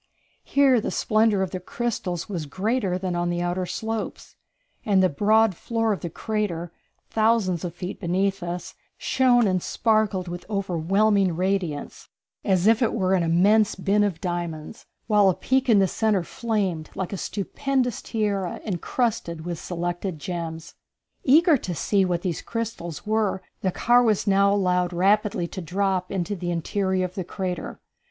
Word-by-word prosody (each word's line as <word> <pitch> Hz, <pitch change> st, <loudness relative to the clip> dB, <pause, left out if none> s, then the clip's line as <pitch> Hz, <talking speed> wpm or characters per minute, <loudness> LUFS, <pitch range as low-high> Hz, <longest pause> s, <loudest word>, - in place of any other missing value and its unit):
Here 270 Hz, -4 st, +4 dB
the -, -, -2 dB
splendor 215 Hz, -3 st, +2 dB
of 190 Hz, -, -4 dB
the 185 Hz, -, -4 dB
crystals 185 Hz, -3 st, -3 dB
was 170 Hz, -7 st, -4 dB
greater 195 Hz, -, -1 dB
than 185 Hz, -1 st, -3 dB
on 175 Hz, 0 st, 0 dB
the 175 Hz, 0 st, -1 dB
outer 180 Hz, +1 st, -1 dB
slopes, 225 Hz, +2 st, -4 dB, 0.5 s
and 195 Hz, -3 st, +3 dB
the 185 Hz, -, +4 dB
broad 215 Hz, +6 st, +3 dB
floor 225 Hz, +4 st, -1 dB
of 195 Hz, -, -4 dB
the 170 Hz, -, -4 dB
crater, 175 Hz, -4 st, -3 dB, 0.4 s
thousands 215 Hz, -6 st, +2 dB
of 175 Hz, -2 st, -5 dB
feet 180 Hz, +2 st, -6 dB
beneath 195 Hz, +2 st, 0 dB
us, 175 Hz, +1 st, -5 dB, 0.2 s
shone 245 Hz, -3 st, +3 dB
and 185 Hz, -2 st, +1 dB
sparkled 215 Hz, -5 st, +1 dB
with 175 Hz, 0 st, -6 dB
overwhelming 195 Hz, 0 st, +1 dB
radiance, 180 Hz, -5 st, -2 dB, 0.3 s
as 185 Hz, -3 st, +2 dB
if 225 Hz, +2 st, +4 dB
it 235 Hz, -, +1 dB
were 190 Hz, -3 st, +1 dB
an 185 Hz, -, +3 dB
immense 195 Hz, +6 st, +3 dB
bin 200 Hz, +2 st, +2 dB
of 195 Hz, -6 st, -1 dB
diamonds, 175 Hz, +2 st, -5 dB, 0.2 s
while 210 Hz, -3 st, +4 dB
a 185 Hz, -, +1 dB
peak 265 Hz, 0 st, 0 dB
in 220 Hz, -, +6 dB
the 195 Hz, -1 st, +4 dB
centre 210 Hz, -1 st, +1 dB
flamed 195 Hz, -6 st, -2 dB
like 190 Hz, +1 st, -3 dB
a -, -, -1 dB
stupendous 245 Hz, +5 st, -2 dB
tiara 200 Hz, -5 st, -2 dB
incrusted 180 Hz, -4 st, -2 dB
with 175 Hz, -2 st, -4 dB
selected 175 Hz, 0 st, -3 dB
gems. 165 Hz, 0 st, -5 dB, 0.5 s
Eager 310 Hz, +3 st, +5 dB
to 180 Hz, -7 st, -5 dB
see 195 Hz, +6 st, +2 dB
what 175 Hz, -1 st, -1 dB
these 175 Hz, -4 st, -2 dB
crystals 220 Hz, -8 st, -5 dB
were, 210 Hz, -3 st, 0 dB, 0.2 s
the 190 Hz, -, 0 dB
car 240 Hz, +6 st, +4 dB
was 220 Hz, -4 st, +2 dB
now 200 Hz, 0 st, +4 dB
allowed 180 Hz, -3 st, +1 dB
rapidly 195 Hz, 0 st, +2 dB
to 185 Hz, -, -7 dB
drop 185 Hz, +1 st, -1 dB
into 195 Hz, +1 st, -2 dB
the 175 Hz, -1 st, -4 dB
interior 185 Hz, +2 st, 0 dB
of 180 Hz, -, -7 dB
the 190 Hz, -, -3 dB
crater. 180 Hz, -1 st, -5 dB
190 Hz, 160 wpm, -24 LUFS, 175-215 Hz, 0.5 s, in